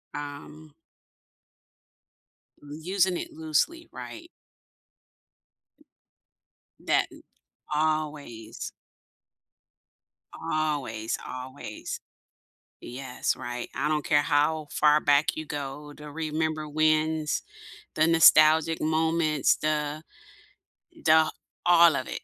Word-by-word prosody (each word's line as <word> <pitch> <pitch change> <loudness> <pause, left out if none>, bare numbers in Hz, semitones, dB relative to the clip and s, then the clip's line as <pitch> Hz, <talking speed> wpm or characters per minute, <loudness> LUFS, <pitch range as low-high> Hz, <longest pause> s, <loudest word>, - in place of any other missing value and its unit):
Um 145 +1 -8 1.9
M 145 - -14
using 185 0 +1
it - - -6
loosely, 160 - -1
right. 335 +1 -9 2.5
That - - +1
and - - -14 0.5
always. 150 -7 -2 1.6
Always, 145 -8 -2
always. 130 -3 -7 0.8
Yes. 130 0 -3
Right. 120 -1 -6
I 145 +3 0
don't 150 -1 0
care 150 -4 +3
how 150 +1 +1
far 150 0 +4
back 145 0 +3
you 155 - -5
go 145 +1 -6
to 150 0 -11
remember 155 0 -2
wins, 155 0 +1 0.5
the 155 +1 +3
nostalgic 160 0 +6
moments, 160 -1 +2
the 150 0 -2 1.0
the 160 0 +5 0.3
all 170 -2 +6
of 130 - -3
it, - - -5
155 Hz, 85 wpm, -27 LUFS, 145-160 Hz, 2.5 s, nostalgic